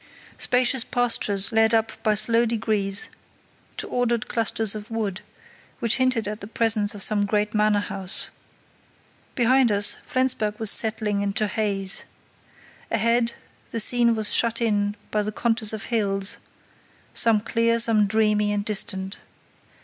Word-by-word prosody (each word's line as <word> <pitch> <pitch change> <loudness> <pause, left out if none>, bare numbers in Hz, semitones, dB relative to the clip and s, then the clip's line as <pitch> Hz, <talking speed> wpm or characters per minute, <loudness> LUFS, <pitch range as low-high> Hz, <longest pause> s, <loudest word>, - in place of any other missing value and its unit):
Spacious 250 0 +2
pastures 220 -6 0
led 225 0 +3
up 225 0 0
by 215 -1 +1
slow 230 +2 +2
degrees 215 -3 -1 0.7
to - - -3
ordered 240 -2 -1
clusters 225 -2 0
of 210 0 -9
wood, 210 -4 -4 0.6
which 230 -1 +1
hinted 255 -5 0
at 210 +1 -6
the 200 - -6
presence 220 -2 +2
of 200 - 0
some 205 -1 +2
great 210 +1 -1
manor 210 -1 +1
house. 195 -2 -1 1.1
Behind 250 0 +3
us, 205 0 +3
Flensburg 235 -5 -1
was 220 -2 +3
settling 215 -2 +1
into 200 +1 -1
haze. 200 -2 -1 0.8
Ahead, 230 +1 0 0.3
the 230 - -4
scene 235 +1 +4
was 215 -1 +2
shut 230 0 +2
in 205 -3 -1 0.2
by 210 - 0
the 210 +1 -4
contours 225 0 +1
of 215 -2 -5
hills, 195 -3 0 0.7
some 225 -2 +3
clear, 230 +2 0
some 220 -3 +4
dreamy 210 0 +1
and 205 0 -2
distant. 195 -2 -2
215 Hz, 140 wpm, -23 LUFS, 205-230 Hz, 1.1 s, scene